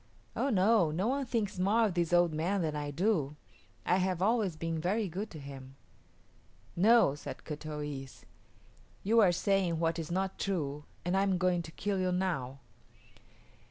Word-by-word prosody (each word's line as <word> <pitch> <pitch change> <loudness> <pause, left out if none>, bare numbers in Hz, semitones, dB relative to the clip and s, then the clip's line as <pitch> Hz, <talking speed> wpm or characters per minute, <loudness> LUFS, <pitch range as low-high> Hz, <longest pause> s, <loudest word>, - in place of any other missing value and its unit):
"Oh 275 - 0
no; 205 - +4
no 180 +9 -1
one 275 0 -1
thinks 210 -6 -2
more 215 +5 +3
of 205 - -1
this 170 -1 0
old 175 -2 +4
man 175 +5 0
than 155 -2 -2
I 145 -1 -3
do. 150 -2 0 0.5
I 180 - +3
have 185 -2 0
always 205 -3 +1
been 165 0 -3
very 200 +5 0
good 195 +5 -5
to 160 - -10
him." 135 -1 -10 1.0
"No," 220 -3 +5
said 145 - -8
Kut 155 0 -7
o 150 -1 -4
yis´. 135 -2 -7 0.8
"You 225 +4 +4
are 195 -5 +6
saying 185 -1 +1
what 165 0 0
is 160 - -5
not 190 +2 -2
true, 150 -7 -2 0.2
and 175 +2 0
I 195 - +3
am 195 -2 +2
going 180 -1 +1
to 160 - -10
kill 200 +3 -2
you 185 0 +1
now." 155 -8 -2
180 Hz, 180 wpm, -31 LUFS, 155-200 Hz, 1.0 s, are